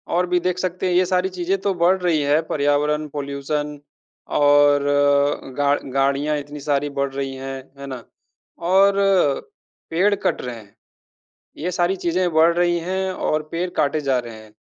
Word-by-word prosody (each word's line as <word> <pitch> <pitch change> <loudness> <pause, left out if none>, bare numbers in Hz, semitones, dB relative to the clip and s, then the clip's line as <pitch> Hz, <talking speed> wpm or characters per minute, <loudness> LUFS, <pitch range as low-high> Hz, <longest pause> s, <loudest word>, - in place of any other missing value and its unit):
और 180 +1 +2
भी 180 0 +2
देख 180 0 -1
सकते 185 0 -2
हैं 180 - 0
ये 185 +1 +4
सारी 185 +1 0
चीज़ें 185 +1 -1
तो 200 -1 0
बढ़ 175 +2 +3
रही 165 -4 +1
है 145 +2 +2
पर्यावरण, 150 +1 +1
पॉल्यूशन 145 +1 -4 0.5
और 145 0 +4 0.8
गा 145 0 +3 0.2
गाड़ियाँ 140 +2 +1
इतनी 145 +1 -9
सारी 145 0 -1
बढ़ 140 0 0
रही 135 -1 -3
है, 135 0 -6 0.2
है 140 - -7
ना? 130 -3 -7 0.6
और 190 +3 +4 1.0
पेड़ 190 +5 +2
कट 200 - -1
रहे 125 -1 -5
हैं, 105 -3 -15 0.8
ये 175 +5 -3
सारी 180 +2 +1
चीज़ें 175 +1 0
बढ़ 160 +2 +5
रही 175 -1 +2
हैं 190 +2 -2
और 155 -3 -1
पेड़ 175 +2 -2
काटे 150 +2 +1
जा 135 -3 +1
रहे 120 -2 -8
हैं, 110 -1 -14
150 Hz, 170 wpm, -21 LUFS, 140-180 Hz, 1.0 s, बढ़